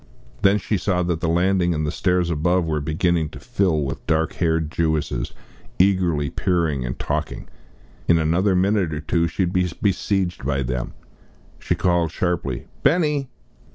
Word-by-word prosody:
Then 100 +1 +5
she 105 +1 -1
saw 90 -1 0
that 85 -2 -1
the 85 - -1
landing 90 0 +2
and 75 0 -1
the 75 - -1
stairs 90 -2 +1
above 85 +3 +1
were 75 -2 -1
beginning 80 +1 0
to - - -11
fill 95 -11 0
with 70 0 -4
dark 80 +1 +1
haired 80 -3 0
Jewesses, 80 -8 -1 0.5
eagerly 90 -7 +2
peering 85 -8 0
and - - -4
talking. - - -3 0.6
In 85 - +5
another 85 +5 +2
minute 95 -3 +1
or 75 - -4
two 85 +3 +1
she 95 - -1
would 90 0 -1
be 90 -1 +2
besieged 95 -5 0
by 70 0 0
them. 65 -1 -3 0.6
She - - -1
called 85 -2 +1
sharply, 80 -8 -2 0.2
"Benny!" 150 -5 +2
85 Hz, 160 wpm, -22 LUFS, 80-95 Hz, 0.6 s, Then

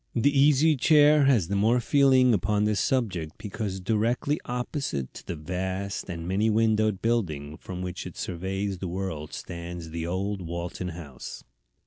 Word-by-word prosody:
The 140 +5 +3
Easy 150 +3 +5
Chair 150 +1 +5
has 120 -11 +3
the 100 - -1
more 110 +5 +3
feeling 130 -1 +4
upon 105 +2 +1
this 105 -1 +1
subject 95 -12 0
because 105 -2 -4
directly 115 +9 0
opposite 125 - -3
to - - -11
the 85 - -3
vast 95 +5 -4
and 85 -1 -5
many 100 +4 +2
windowed 110 -2 +2
building 80 -11 -1
from 90 +2 -7
which 90 0 -5
it - - -11
surveys 95 +2 -3
the 95 - -4
world 85 -4 -4
stands 85 -1 -7
the 85 0 -3
old 95 +2 -2
Walton 85 +1 -4
House. 80 -7 -8
100 Hz, 155 wpm, -27 LUFS, 85-120 Hz, -, Easy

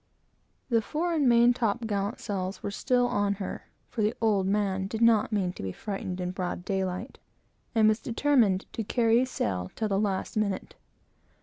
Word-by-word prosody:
The 230 -2 +3
fore 330 +9 -2
and 290 -6 +3
main 235 +1 +6
top 235 -1 -1
gallant 205 +1 -2
sails 195 -2 -4
were 200 - -2
still 245 +4 +1
on 205 -5 +1
her, 195 -1 -6 0.2
for 230 - -4
the 210 +2 +1
"old 205 -4 +2
man" 195 -1 0
did 220 +2 -4
not 230 -2 +4
mean 190 -4 0
to - - -9
be 95 - -3
frightened 190 - -5
in 180 0 -2
broad 180 -1 -4
daylight, 190 +3 -3 0.6
and 220 -1 +5
was 215 +1 +3
determined 235 -6 +2
to 225 - -3
carry 230 +2 +3
sail 95 - -2
till 220 -1 -1
the 195 -1 +1
last 200 -3 -1
minute. 205 -3 -1
210 Hz, 180 wpm, -28 LUFS, 190-230 Hz, 0.6 s, main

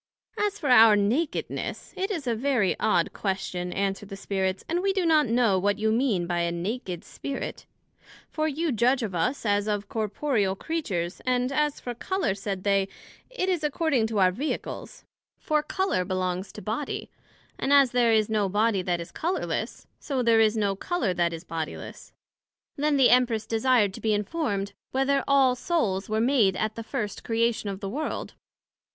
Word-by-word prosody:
As 415 -1 -1
for 295 -7 -3
our 225 -3 +8
Nakedness, 235 +11 -1
it 385 +2 -2
is 335 -9 -3
a 240 - +1
very 235 -5 +1
odd 170 - +2
question, 185 -2 -3
answered 195 +1 -2
the 195 - -6
Spirits; 190 -1 -2
and 345 +2 0
we 390 0 +1
do 380 -3 0
not 310 -3 +4
know 230 -4 +3
what 200 +1 +1
you 220 0 +1
mean 220 -7 +1
by 175 0 -1
a 170 0 0
Naked 180 0 -4
Spirit; 280 -1 -6 0.6
for 310 0 -1
you 315 +2 -1
judg 250 +2 +2
of 205 -4 -3
us 235 +11 -1
as 205 0 +1
of 205 -1 -2
corporeal 215 -2 0
Creatures; 195 - -3
and 250 0 +1
as 295 +1 0
for 245 - -5
Colour, 375 - -1
said 195 -1 -4
they, 195 -1 +2 0.4
it - - -2
is 355 -4 0
according 295 -5 +1
to 220 -1 -3
our 185 -2 +5
Vehicles; 275 +11 -5 0.3
for 305 -4 0
Colour 375 - 0
belongs 185 +1 -2
to 210 - -9
Body, 225 +7 -4 0.5
and 270 - -1
as 280 -3 +6
there 245 -2 +3
is 215 -1 +3
no 210 -3 0
Body 205 0 +2
that 180 -1 -1
is 170 0 -7
colourless, 350 +4 -3
so 270 -4 -2
there 230 -1 +4
is 220 0 +3
no 200 -2 +1
Colour 230 - -1
that 175 -1 +1
is 165 0 -7
bodiless. 165 -3 -6 0.6
Then 295 0 +1
the 265 -2 +6
Empress 240 -3 +3
desired 225 -3 +2
to - - -9
be 215 -1 +2
informed, 205 -3 -2 0.2
Whether 270 +1 +1
all 275 -2 +5
Souls 230 - -1
were 215 0 0
made 230 -6 +3
at 215 0 -1
the 230 - -6
first 225 -3 -4
Creation 230 -2 0
of 195 -1 -6
the 195 - -3
World? 295 +9 -4
225 Hz, 180 wpm, -26 LUFS, 195-275 Hz, 0.6 s, our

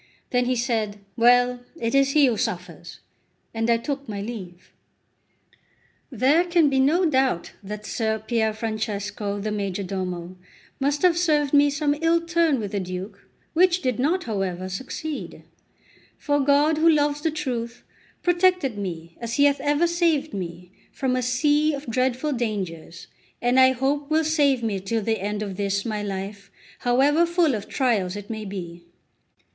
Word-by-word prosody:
Then 245 0 +2
he 255 +1 +1
said: 225 -4 -1 0.2
"Well, 245 +1 +4 0.2
it 230 0 -1
is 275 0 +3
he 295 -2 +6
who 245 -3 +2
suffers!" 180 -3 -5 0.5
and 225 +1 -1
I 235 - +4
took 275 +1 -5
my 205 -1 -4
leave. 195 -5 -8 1.4
There 275 +7 +3
can 340 -4 +3
be 265 - +2
no 320 +8 +3
doubt 265 - +1
that 210 +1 -7
Ser 220 -1 -1
Pier 220 0 0
Francesco, 210 -2 -3
the 210 +1 -3
majordomo, 185 -3 -4 0.4
must 285 +3 0
have 360 -2 +5
served 300 -5 +1
me 290 0 +6
some 290 0 0
ill 330 +1 +3
turn 335 -4 +1
with 205 -3 -4
the 205 - -1
Duke, 185 +2 -7 0.2
which 360 +1 +3
did 255 -3 -1
not, 335 +8 +1
however, 190 -4 -3
succeed; 265 +9 -6 0.7
for 290 -1 0
God, 290 +3 +3
who 330 +1 +5
loves 295 -1 +2
the 320 - +1
truth, 245 -6 -4 0.4
protected 355 - +2
me, 170 -4 -6
as 230 0 -3
He 285 - +4
hath 280 -1 +2
ever 290 +3 +2
saved 335 -3 +1
me, 180 -2 -6 0.2
from 260 -2 -1
a 255 - 0
sea 295 +4 +2
of 280 +1 -8
dreadful 255 +4 0
dangers, 190 -9 -4 0.3
and 245 +2 +2
I 260 0 +6
hope 280 +3 -1
will 315 +1 +2
save 285 -5 +2
me 210 -4 -1
till 215 +4 -2
the 220 0 0
end 210 +2 -3
of 195 -3 -6
this 200 -1 -1
my 215 -2 -2
life, 200 0 -5 0.3
however 280 +7 +3
full 340 -4 +2
of 210 -2 -5
trials 210 -9 0
it 205 +1 -7
may 215 -1 -5
be. 175 -3 -7
245 Hz, 160 wpm, -24 LUFS, 205-290 Hz, 1.4 s, he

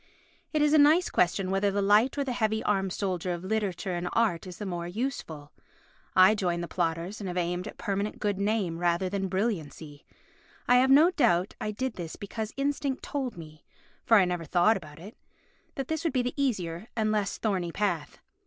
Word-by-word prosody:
It 305 -2 +2
is 300 0 +3
a 310 - +6
nice 310 +5 +5
question 185 +2 +1
whether 195 +1 +2
the 200 +1 -1
light 210 +7 +3
or 285 - +1
the 270 - -3
heavy 220 -2 0
armed 195 -2 0
soldier 180 -2 -2
of 175 0 -6
literature 195 -2 -2
and 175 0 -2
art 195 -7 +1
is 180 - -9
the 210 - -6
more 175 -2 -4
useful. 175 - -5 0.6
I 185 +3 +7
joined 175 -4 -1
the - - -4
plodders 170 +3 -2
and 195 - -4
have 180 0 -4
aimed 175 +2 -1
at - - -9
permanent 200 +1 -2
good 205 -2 -1
name 200 -5 0
rather 175 +1 +1
than 195 0 -2
brilliancy. 170 -7 -3 0.6
I 245 - +6
have 260 +1 +4
no 305 +6 +7
doubt 200 - +2
I 215 - -2
did 250 +4 -3
this 170 -3 -6
because 215 +2 -5
instinct 280 -1 -1
told 265 -8 -4
me 155 -2 -11 0.4
(for 225 - +5
I 195 - +5
never 175 -2 -3
thought 175 +7 +3
about 155 -6 -9
it) 195 +7 -11 0.6
that 270 -2 -4
this 320 0 -2
would 330 - 0
be 255 -2 +1
the 245 - -2
easier 200 - -2
and 215 -2 +1
less 210 -2 -1
thorny 185 -6 -1
path. 175 -6 -2
200 Hz, 200 wpm, -28 LUFS, 175-230 Hz, 0.6 s, I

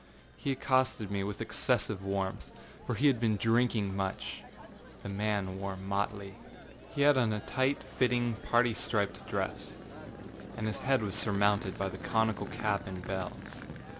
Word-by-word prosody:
He 140 - -2
accosted 130 -6 +1
me 100 -1 0
with 100 +2 -4
excessive 110 -4 0
warmth, 95 -1 -2 0.4
for - - 0
he 145 - +1
had 135 -5 +5
been 110 -2 +2
drinking 115 -3 +2
much. 95 -1 -3 0.6
The - - -5
man 100 -2 -1
wore 95 -1 -3
motley. 100 +1 -2 0.6
He 140 - +1
had 145 -2 +6
on 115 -3 +3
a 105 - -1
tight 130 +5 0
fitting 120 -2 +1
parti 120 0 +3
striped 105 -2 -1
dress, - - -3 0.8
and 110 - -2
his 110 - -1
head 135 -3 +2
was 100 -2 -2
surmounted 100 -1 +2
by 95 - 0
the 95 0 -6
conical 110 +3 +1
cap 100 -2 -1
and 95 -1 -6
bells. 95 -1 -5
105 Hz, 155 wpm, -32 LUFS, 100-120 Hz, 0.8 s, had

